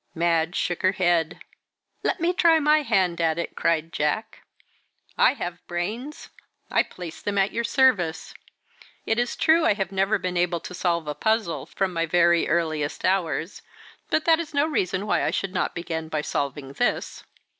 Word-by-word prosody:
Madge 165 Hz, 0 st, +1 dB
shook 175 Hz, -, -1 dB
her 185 Hz, +1 st, +3 dB
head. 175 Hz, -4 st, +1 dB, 0.6 s
"Let -, -, -1 dB
me 340 Hz, +2 st, +1 dB
try 335 Hz, -2 st, +4 dB
my 305 Hz, 0 st, +4 dB
hand 180 Hz, -, +1 dB
at 160 Hz, -1 st, +1 dB
it," 170 Hz, -, -4 dB
cried 165 Hz, 0 st, 0 dB
Jack. 150 Hz, +9 st, -2 dB, 0.7 s
"I -, -, +4 dB
have 175 Hz, -7 st, -5 dB
brains 215 Hz, -, -5 dB, 0.4 s
I -, -, +4 dB
place 175 Hz, -3 st, -8 dB
them 205 Hz, -1 st, -2 dB
at 195 Hz, 0 st, +2 dB
your 235 Hz, -, -2 dB
service. 225 Hz, -, +2 dB, 0.7 s
It 225 Hz, +1 st, +1 dB
is 245 Hz, -, -1 dB
true 320 Hz, +1 st, +3 dB
I 260 Hz, -, +3 dB, 0.2 s
never 195 Hz, +2 st, +1 dB
have -, -, -3 dB
been 180 Hz, -1 st, -2 dB
able 175 Hz, -1 st, +1 dB
to -, -, -8 dB
solve 170 Hz, -3 st, -1 dB
a 150 Hz, -, -2 dB
puzzle 220 Hz, +3 st, -1 dB
from 190 Hz, -2 st, -2 dB
my 165 Hz, 0 st, -1 dB
very 170 Hz, 0 st, +3 dB
earliest 155 Hz, -3 st, -1 dB
hours, 180 Hz, -2 st, -1 dB, 0.5 s
but 310 Hz, -, +1 dB
that 325 Hz, -1 st, +5 dB
is 310 Hz, -3 st, -6 dB
no 285 Hz, +1 st, +3 dB
reason 195 Hz, -, -1 dB
why -, -, +1 dB
I -, -, +1 dB
should 195 Hz, -1 st, -2 dB
not 185 Hz, -, -1 dB
begin 160 Hz, -2 st, -4 dB
by 155 Hz, -1 st, -1 dB
solving 140 Hz, -1 st, -3 dB
this." -, -, -1 dB
180 Hz, 175 wpm, -24 LUFS, 165-220 Hz, 0.7 s, that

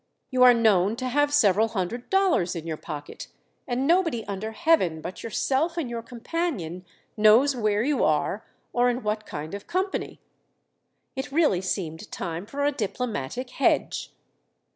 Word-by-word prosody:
You 255 Hz, -1 st, +1 dB
are 250 Hz, -1 st, +9 dB
known 210 Hz, -3 st, +3 dB
to 255 Hz, +2 st, -3 dB
have 290 Hz, +3 st, +2 dB
several 220 Hz, -6 st, +4 dB
hundred 225 Hz, +3 st, -4 dB
dollars 370 Hz, -, +2 dB
in 165 Hz, -1 st, -5 dB
your 160 Hz, -1 st, -3 dB
pocket, 145 Hz, -1 st, -8 dB, 0.4 s
and 250 Hz, +2 st, -1 dB
nobody 330 Hz, -8 st, +2 dB
under 200 Hz, +2 st, -4 dB
Heaven 220 Hz, -, +2 dB
but 175 Hz, +3 st, -7 dB
yourself 275 Hz, +8 st, 0 dB
and 280 Hz, -8 st, -2 dB
your 235 Hz, -1 st, -3 dB
companion 230 Hz, -, -4 dB, 0.3 s
knows 225 Hz, +6 st, +5 dB
where 215 Hz, -2 st, +1 dB
you 285 Hz, -1 st, +1 dB
are, 155 Hz, +7 st, +1 dB, 0.3 s
or 245 Hz, 0 st, +3 dB
in 245 Hz, +1 st, -2 dB
what 215 Hz, 0 st, -2 dB
kind 155 Hz, +4 st, -6 dB
of 200 Hz, 0 st, -7 dB
company." 375 Hz, +2 st, -2 dB, 1.0 s
It 265 Hz, +2 st, -4 dB
really 295 Hz, -, +3 dB
seemed 170 Hz, -4 st, -4 dB
time 170 Hz, +4 st, -5 dB
for 285 Hz, +5 st, -2 dB
a 290 Hz, -, +3 dB
diplomatic 245 Hz, -, -4 dB
"hedge." 275 Hz, -, 0 dB
230 Hz, 155 wpm, -26 LUFS, 190-275 Hz, 1.0 s, are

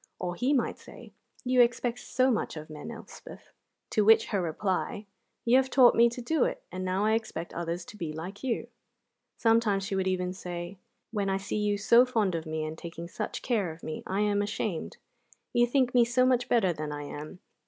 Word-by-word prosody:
Or 180 Hz, -1 st, -3 dB
he 250 Hz, +9 st, 0 dB
might 270 Hz, -4 st, 0 dB
say: -, -, -13 dB, 0.3 s
"You 250 Hz, 0 st, +4 dB
expect 240 Hz, 0 st, +1 dB
so 260 Hz, +1 st, +1 dB
much 215 Hz, -, -2 dB
of 155 Hz, 0 st, -8 dB
men, 150 Hz, +6 st, -8 dB
Elspeth." 230 Hz, -1 st, -11 dB, 0.4 s
To 215 Hz, -, +3 dB
which 220 Hz, +2 st, +6 dB
her 200 Hz, -4 st, 0 dB
reply: 185 Hz, +4 st, -2 dB, 0.4 s
"You 240 Hz, +2 st, +5 dB
have 265 Hz, 0 st, +2 dB
taught 250 Hz, -2 st, +6 dB
me 235 Hz, +1 st, +5 dB
to 240 Hz, +1 st, -7 dB
do 310 Hz, +2 st, +2 dB
it, -, -, -2 dB
and 185 Hz, +1 st, -4 dB
now 185 Hz, +2 st, 0 dB
I 215 Hz, -, +3 dB
expect 220 Hz, -7 st, -3 dB
others 170 Hz, +1 st, -3 dB
to 210 Hz, -, -12 dB
be 165 Hz, -5 st, -4 dB
like 180 Hz, +8 st, -7 dB
you." 250 Hz, -3 st, -1 dB, 0.7 s
Sometimes 225 Hz, -4 st, +3 dB
she 200 Hz, -1 st, -2 dB
would 190 Hz, -1 st, 0 dB
even 180 Hz, -1 st, -1 dB
say: 180 Hz, 0 st, -6 dB, 0.3 s
"When 205 Hz, -3 st, -1 dB
I 195 Hz, -, +1 dB
see 195 Hz, +2 st, -4 dB
you 205 Hz, -1 st, +1 dB
so 235 Hz, +4 st, +6 dB
fond 225 Hz, -7 st, 0 dB
of 165 Hz, -1 st, -3 dB
me, 155 Hz, 0 st, -2 dB
and 155 Hz, 0 st, -5 dB
taking 170 Hz, 0 st, -7 dB
such -, -, -5 dB
care 210 Hz, -9 st, 0 dB
of 160 Hz, +1 st, -13 dB
me, 155 Hz, -, -5 dB
I 195 Hz, +2 st, 0 dB
am 205 Hz, -1 st, +2 dB
ashamed. 205 Hz, -4 st, -3 dB, 0.6 s
You 240 Hz, 0 st, +4 dB
think 255 Hz, 0 st, +2 dB
me 245 Hz, -1 st, +6 dB
so 240 Hz, +2 st, +2 dB
much 250 Hz, -1 st, +2 dB
better 195 Hz, -7 st, +3 dB
than 155 Hz, -1 st, -5 dB
I 145 Hz, 0 st, -5 dB
am. 150 Hz, +4 st, -8 dB
205 Hz, 210 wpm, -29 LUFS, 175-235 Hz, 0.7 s, which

